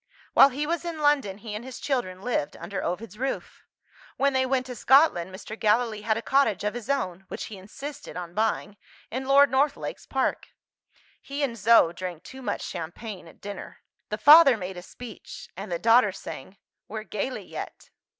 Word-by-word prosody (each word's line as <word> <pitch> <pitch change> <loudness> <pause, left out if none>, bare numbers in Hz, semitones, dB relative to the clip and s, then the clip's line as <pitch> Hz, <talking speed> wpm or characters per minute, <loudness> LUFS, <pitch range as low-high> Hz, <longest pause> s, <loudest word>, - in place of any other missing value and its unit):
While 275 - +8
he 285 +3 -3
was 335 +2 -1
in 340 -2 -4
London, 285 -10 +2
he 215 0 -8
and 210 +2 -5
his 260 -1 -8
children 200 -9 -2
lived 230 -12 -1
under 190 +3 -5
Ovid's 205 +4 -4
roof. 270 +1 -4 0.6
When 280 0 +2
they 260 0 +2
went 255 -1 +1
to 250 -1 -7
Scotland, 250 - +4
Mr. 195 +3 -9
Gallilee 220 0 +1
had 220 +1 +1
a 230 - -4
cottage 245 -9 +2
of 210 - -1
his 240 +1 -7
own 190 -9 -1
(which - - -6
he - - -8
insisted 275 +9 -8
on 175 -1 -6
buying) 210 -1 -1 0.3
in 260 +3 -3
Lord 280 +1 +6
Northlake's 280 +2 0
park. - - -1 0.7
He 280 +1 -4
and 250 -4 -1
Zo 225 -5 +5
drank 175 -1 -6
too 265 - -10
much - - -3
champagne 180 +3 -6
at - - -17
dinner. 200 -1 -8 0.3
The 210 - -2
father 290 +1 +8
made 185 -1 -6
a - - -6
speech; 230 +4 -10
and 195 +1 -7
the 170 - 0
daughter 230 +1 +5
sang, 185 0 -9 0.3
"We're 215 0 -5
gayly 220 +5 -4
yet." - - -8
225 Hz, 185 wpm, -26 LUFS, 195-270 Hz, 0.7 s, While